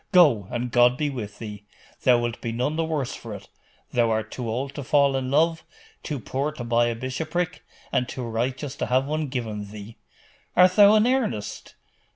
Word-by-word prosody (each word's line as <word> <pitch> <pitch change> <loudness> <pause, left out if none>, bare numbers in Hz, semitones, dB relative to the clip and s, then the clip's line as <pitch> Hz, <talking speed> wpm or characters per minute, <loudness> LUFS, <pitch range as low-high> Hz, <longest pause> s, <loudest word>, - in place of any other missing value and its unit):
Go, 145 - +5
and 120 0 -3
God 125 +1 +5
be 150 -1 -1
with 105 -6 -6
thee! 105 -2 -8 0.4
Thou 125 -2 +5
wilt 120 -1 -3
be 115 - -3
none 125 +6 -1
the 165 - 0
worse 155 -5 -2
for 115 -3 -7
it. 100 - -11 0.4
Thou 120 -1 +2
art 110 0 -1
too 120 -3 -4
old 135 +5 -3
to 145 - -6
fall 140 0 +3
in 130 -1 -2
love, 160 +3 +2 0.4
too 145 -3 -4
poor 135 +6 -2
to 130 - -6
buy 120 0 +2
a 120 - -1
bishopric, 160 +8 -3 0.3
and 125 - 0
too 130 - -5
righteous 125 +5 -3
to - - -2
have 130 +2 +2
one 155 +1 -2
given 110 -6 -4
thee.' 105 +2 -10 0.6
'Art 180 +1 +7
thou 205 0 +8
in 215 +1 +4
earnest? 245 - -1
125 Hz, 195 wpm, -25 LUFS, 115-150 Hz, 0.6 s, thou